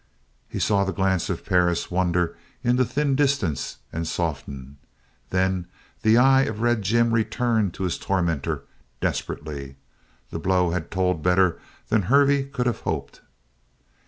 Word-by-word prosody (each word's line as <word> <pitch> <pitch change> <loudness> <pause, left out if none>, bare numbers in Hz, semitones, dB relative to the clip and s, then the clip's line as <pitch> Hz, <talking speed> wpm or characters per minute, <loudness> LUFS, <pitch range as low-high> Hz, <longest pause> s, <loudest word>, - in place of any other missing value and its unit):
He - - -5
saw 100 -2 +2
the 95 - -1
glance 95 -2 0
of - - -3
Perris 90 -1 +1
wander 90 -1 +1 0.3
into 125 +1 +3
thin 140 +3 0
distance 135 - 0 0.2
and 80 0 -3
soften. 70 -5 -4 0.5
Then 95 -1 0 0.3
the 110 +1 +5
eye 135 +2 +6
of 110 -1 -4
Red 120 -1 +2
Jim 115 +4 +2
returned 115 -3 +1
to - - -4
his 90 -3 -1
tormentor, 85 -6 -1 0.4
desperately. 70 -3 -4 0.6
The 85 - -4
blow 90 0 +2
had 85 -2 -3
told 90 -3 0
better 90 +1 +3 0.3
than 110 - +3
Hervey 140 +6 +3
could 135 -2 -3
have 120 -3 0
hoped. - - -4
95 Hz, 140 wpm, -24 LUFS, 85-120 Hz, 0.6 s, eye